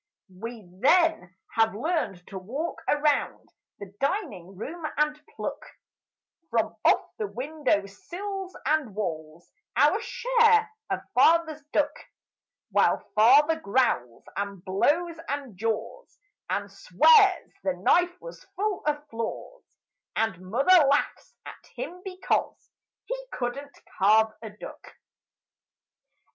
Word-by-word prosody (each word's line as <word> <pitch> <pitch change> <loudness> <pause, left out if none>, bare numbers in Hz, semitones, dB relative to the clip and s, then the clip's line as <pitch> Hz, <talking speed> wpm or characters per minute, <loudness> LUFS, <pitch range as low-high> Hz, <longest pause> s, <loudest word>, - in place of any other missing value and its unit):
We 225 0 -8
then 320 - +3 0.2
have 225 -2 +2
learned 240 - -2
to 190 - -6
walk 270 - -5
around 295 -1 +1 0.3
the 200 -1 -10
dining 275 - -2
room 320 - -7
and 300 0 +1
pluck - - -5 0.9
From 225 -1 0
off - - +3
the 210 - -1
windowsills 305 - -3
and 295 -10 0
walls 160 -4 -5 0.3
Our - - +4
share 450 -3 +3 0.2
of - - -1
Father's 320 -2 +4
duck 295 0 +1 0.8
While - - +2
Father 290 +9 +5
growls 200 - 0
and 200 -2 -5
blows 315 - +1
and 275 -6 -4
jaws 225 - -4 0.3
And - - -2
swears 430 -7 +4
the 190 -1 +1
knife 350 - +2
was - - -11
full 405 +1 -1
of 295 0 -1
flaws 225 0 -6 0.5
And 220 -5 -1
Mother 300 - +5
laughs 285 +1 -1
at - - -11
him 360 -7 -6
because 370 -1 -2 0.3
He - - -4
couldn't 275 +4 -5 0.2
carve 215 +2 +4
a 220 - -7
duck. 210 - -12
280 Hz, 110 wpm, -26 LUFS, 210-340 Hz, 0.9 s, Father